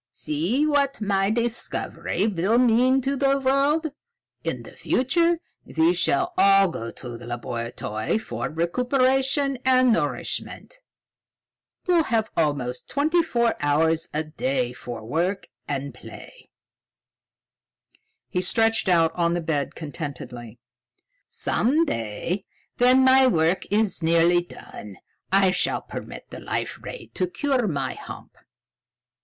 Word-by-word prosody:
"See 180 Hz, -, -1 dB
what 285 Hz, -2 st, +1 dB
my 195 Hz, -2 st, +1 dB
discovery 235 Hz, -3 st, -2 dB
will 205 Hz, +2 st, +1 dB
mean 250 Hz, +2 st, +4 dB
to 275 Hz, +2 st, -1 dB
the 275 Hz, 0 st, +2 dB
world! 280 Hz, +4 st, +1 dB, 0.5 s
In -, -, -3 dB
the -, -, -12 dB
future 335 Hz, +6 st, +1 dB, 0.3 s
we 160 Hz, +2 st, +2 dB
shall 350 Hz, -, +1 dB
all 195 Hz, -1 st, +6 dB
go 115 Hz, -8 st, -5 dB
to 120 Hz, -1 st, -9 dB
the 120 Hz, -, -10 dB
laboratory 115 Hz, -, -3 dB
for 220 Hz, -, -4 dB
recuperation 260 Hz, -, +1 dB
and 255 Hz, -2 st, +5 dB
nourishment. -, -, -3 dB, 1.1 s
We'll 345 Hz, -3 st, +3 dB
have 225 Hz, -1 st, 0 dB
almost 140 Hz, -6 st, -1 dB
twenty 310 Hz, +5 st, +2 dB
four 235 Hz, -7 st, +1 dB
hours 160 Hz, +3 st, +1 dB
a 155 Hz, +1 st, -1 dB
day 130 Hz, -5 st, -2 dB
for 120 Hz, -3 st, -7 dB
work 175 Hz, -, -1 dB, 0.2 s
and 140 Hz, -1 st, -3 dB
play." -, -, -13 dB, 1.8 s
He 180 Hz, -, -1 dB
stretched 225 Hz, +2 st, +2 dB
out 165 Hz, -2 st, +3 dB
on 170 Hz, -1 st, +1 dB
the -, -, 0 dB
bed 160 Hz, -4 st, -2 dB
contentedly. 130 Hz, -7 st, -7 dB, 0.7 s
"Some 300 Hz, +8 st, +1 dB
day, 115 Hz, -, -3 dB, 0.4 s
when 255 Hz, +2 st, +5 dB
my 260 Hz, 0 st, +6 dB
work 165 Hz, -4 st, +2 dB
is 210 Hz, -2 st, 0 dB
nearly 170 Hz, +2 st, +4 dB
done, 105 Hz, -, -11 dB, 0.3 s
I 195 Hz, -1 st, +4 dB
shall 180 Hz, -, -1 dB
permit -, -, -9 dB
the -, -, -8 dB
Life -, -, -3 dB
Ray -, -, -9 dB
to 185 Hz, -, -1 dB
cure 255 Hz, +4 st, 0 dB
my 140 Hz, -7 st, -2 dB
hump." -, -, -10 dB
195 Hz, 125 wpm, -24 LUFS, -, 1.8 s, all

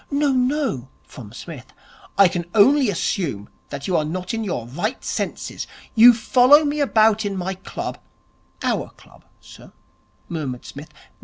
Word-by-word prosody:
('No 285 Hz, 0 st, +1 dB
no,' 255 Hz, -, -1 dB
from 110 Hz, -5 st, -12 dB
Psmith.) 130 Hz, +1 st, -10 dB, 0.4 s
'I 200 Hz, -1 st, +7 dB
can 175 Hz, -2 st, -4 dB
only 260 Hz, +4 st, +5 dB
assume 165 Hz, -, -2 dB, 0.2 s
that 140 Hz, -1 st, -6 dB
you 185 Hz, -, 0 dB
are 155 Hz, -, +2 dB
not 180 Hz, +5 st, -4 dB
in 225 Hz, 0 st, -2 dB
your 175 Hz, -, -3 dB
right 175 Hz, -, -4 dB
senses. -, -, -4 dB, 0.3 s
You 235 Hz, +2 st, +9 dB
follow 255 Hz, +6 st, +5 dB
me 295 Hz, +1 st, -1 dB
about 220 Hz, -5 st, +3 dB
in 200 Hz, -2 st, -3 dB
my 185 Hz, +1 st, -3 dB
club 190 Hz, -, -7 dB, 0.3 s
' -, -, -20 dB
'Our -, -, -1 dB
club, -, -, -20 dB
sir,' -, -, -15 dB, 0.5 s
murmured 140 Hz, -7 st, -5 dB
Psmith. 145 Hz, +3 st, -10 dB
195 Hz, 155 wpm, -21 LUFS, 155-250 Hz, 0.5 s, You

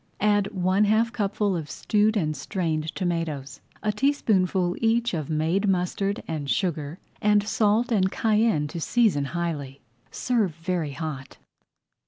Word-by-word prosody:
Add 205 Hz, -1 st, +2 dB
one 185 Hz, +2 st, +2 dB
half 225 Hz, +3 st, +2 dB
cupful 205 Hz, -2 st, 0 dB
of 155 Hz, -4 st, -4 dB
stewed 215 Hz, +7 st, +1 dB
and 155 Hz, -5 st, 0 dB
strained 155 Hz, +1 st, -2 dB
tomatoes, 160 Hz, -7 st, -3 dB, 0.2 s
a 215 Hz, -, +2 dB
teaspoonful 195 Hz, -8 st, +1 dB
each 230 Hz, 0 st, +1 dB
of 155 Hz, -4 st, -3 dB
made 160 Hz, +6 st, +1 dB
mustard 195 Hz, +2 st, -1 dB
and 150 Hz, -3 st, -4 dB
sugar, 160 Hz, -4 st, -1 dB, 0.2 s
and 210 Hz, 0 st, +3 dB
salt 220 Hz, +3 st, +2 dB
and 190 Hz, -4 st, +2 dB
cayenne 215 Hz, -9 st, +2 dB
to 170 Hz, -, -6 dB
season 210 Hz, -10 st, +2 dB
highly. 145 Hz, -4 st, -4 dB, 0.3 s
Serve 220 Hz, -10 st, 0 dB
very 165 Hz, -3 st, -2 dB
hot. 140 Hz, -4 st, -6 dB
185 Hz, 135 wpm, -25 LUFS, 155-210 Hz, 0.3 s, and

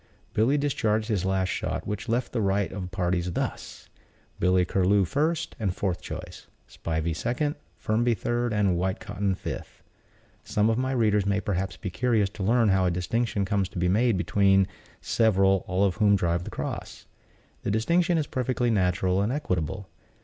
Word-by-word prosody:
Billy 125 Hz, +7 st, +3 dB
discharged 110 Hz, -6 st, 0 dB
his 100 Hz, -4 st, 0 dB
last 95 Hz, -1 st, +1 dB
shot, -, -, -3 dB
which 105 Hz, +3 st, -4 dB
left 120 Hz, +3 st, 0 dB
the 115 Hz, -, -1 dB
rights 100 Hz, 0 st, 0 dB
of 95 Hz, -2 st, -5 dB
parties 90 Hz, -1 st, -1 dB
thus: -, -, -4 dB, 0.5 s
Billy 90 Hz, 0 st, +3 dB
Curlew 95 Hz, +2 st, +2 dB
first 155 Hz, -, -1 dB
and 95 Hz, -5 st, -1 dB
fourth 95 Hz, -3 st, -2 dB
choice, -, -, -8 dB, 0.2 s
Spivey 80 Hz, 0 st, -3 dB
second, 125 Hz, -, -1 dB, 0.2 s
Firmby 115 Hz, +2 st, +1 dB
third 120 Hz, +2 st, -1 dB
and 100 Hz, -4 st, +2 dB
Whitecotton 95 Hz, +1 st, -1 dB
fifth. -, -, -7 dB, 0.6 s
Some 105 Hz, +2 st, +1 dB
of 115 Hz, -, 0 dB
my 130 Hz, +1 st, 0 dB
readers 105 Hz, -5 st, +2 dB
may 100 Hz, 0 st, +2 dB
perhaps 95 Hz, -1 st, -2 dB
be 95 Hz, -, -5 dB
curious 110 Hz, -1 st, +1 dB
to 100 Hz, -, -9 dB
learn 115 Hz, +3 st, +3 dB
how 95 Hz, -1 st, +3 dB
a -, -, +3 dB
distinction 100 Hz, +4 st, -1 dB
comes 95 Hz, -1 st, 0 dB
to 95 Hz, -, -9 dB
be 90 Hz, +1 st, +1 dB
made 110 Hz, +2 st, +3 dB
between 95 Hz, +1 st, +3 dB, 0.4 s
several, 95 Hz, -4 st, +3 dB
all 95 Hz, +2 st, +2 dB
of 95 Hz, +1 st, 0 dB
whom 105 Hz, -2 st, +4 dB
drive 85 Hz, -2 st, 0 dB
the -, -, -5 dB
cross. -, -, -6 dB, 0.6 s
The -, -, -3 dB
distinction 170 Hz, -, +2 dB
is 155 Hz, -, 0 dB
perfectly 125 Hz, -2 st, -1 dB
natural 95 Hz, -1 st, +1 dB
and 105 Hz, +4 st, 0 dB
equitable. 95 Hz, -, -2 dB
100 Hz, 170 wpm, -26 LUFS, 95-115 Hz, 0.6 s, whom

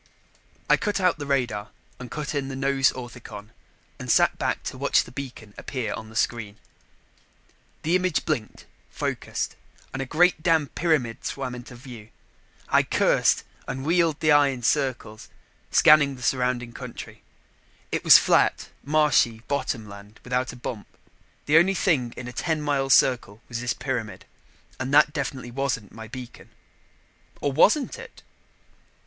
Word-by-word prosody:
I -, -, +5 dB
cut 205 Hz, -2 st, -1 dB
out 180 Hz, -4 st, +2 dB
the 145 Hz, -, -5 dB
radar 120 Hz, -7 st, -1 dB, 0.3 s
and 125 Hz, -1 st, -8 dB
cut 150 Hz, +5 st, -4 dB
in 140 Hz, -2 st, -2 dB
the 135 Hz, -, -5 dB
nose 135 Hz, 0 st, +2 dB
orthicon 120 Hz, -4 st, -10 dB, 0.5 s
and -, -, -7 dB
sat -, -, +4 dB
back -, -, -1 dB
to -, -, -6 dB
watch -, -, +3 dB
the -, -, -13 dB
beacon 125 Hz, -6 st, -8 dB
appear 130 Hz, -4 st, -4 dB
on 110 Hz, -, -8 dB
the 110 Hz, -, -14 dB
screen. 110 Hz, -3 st, -1 dB, 1.3 s
The 165 Hz, +3 st, +2 dB
image 185 Hz, -3 st, 0 dB
blinked, 135 Hz, -9 st, -3 dB, 0.2 s
focused -, -, -3 dB, 0.4 s
and 135 Hz, -, -3 dB
a 135 Hz, -, -4 dB
great 175 Hz, +3 st, +3 dB
damn 160 Hz, -4 st, +2 dB
pyramid 145 Hz, -9 st, -1 dB
swam 130 Hz, -2 st, -4 dB
into 125 Hz, 0 st, -9 dB
view. 120 Hz, -4 st, -11 dB, 0.6 s
I -, -, +4 dB
cursed -, -, +2 dB, 0.2 s
and 135 Hz, 0 st, -5 dB
wheeled 165 Hz, -2 st, +2 dB
the 155 Hz, -, +3 dB
eye 145 Hz, -1 st, +6 dB
in 130 Hz, -3 st, -4 dB
circles, 125 Hz, -5 st, -1 dB, 0.4 s
scanning 145 Hz, -3 st, +5 dB
the 125 Hz, -, -11 dB
surrounding 125 Hz, -1 st, 0 dB
country. -, -, -9 dB, 0.7 s
It -, -, -2 dB
was -, -, +10 dB
flat, -, -, +2 dB
marshy 140 Hz, -6 st, +2 dB
bottom 130 Hz, -6 st, -2 dB
land 100 Hz, +1 st, -13 dB
without 125 Hz, 0 st, -1 dB
a -, -, -11 dB
bump. 120 Hz, -3 st, -6 dB, 0.6 s
The 155 Hz, +2 st, +6 dB
only 190 Hz, +3 st, +2 dB
thing 135 Hz, -12 st, +1 dB
in 125 Hz, -, -6 dB
a 125 Hz, -, -7 dB
ten 160 Hz, +1 st, -1 dB
mile 140 Hz, -2 st, -1 dB
circle 120 Hz, -6 st, +3 dB
was 115 Hz, -1 st, -5 dB
this 125 Hz, -1 st, -1 dB
pyramid 115 Hz, -8 st, -4 dB, 0.5 s
and 130 Hz, 0 st, -3 dB
that 150 Hz, 0 st, +5 dB
definitely 130 Hz, -3 st, -4 dB
wasn't 125 Hz, -5 st, -2 dB
my 110 Hz, 0 st, -10 dB
beacon. 125 Hz, +2 st, -10 dB, 0.9 s
Or 145 Hz, -, -1 dB
wasn't 215 Hz, -, +3 dB
it? -, -, -12 dB
130 Hz, 155 wpm, -25 LUFS, 120-150 Hz, 1.3 s, was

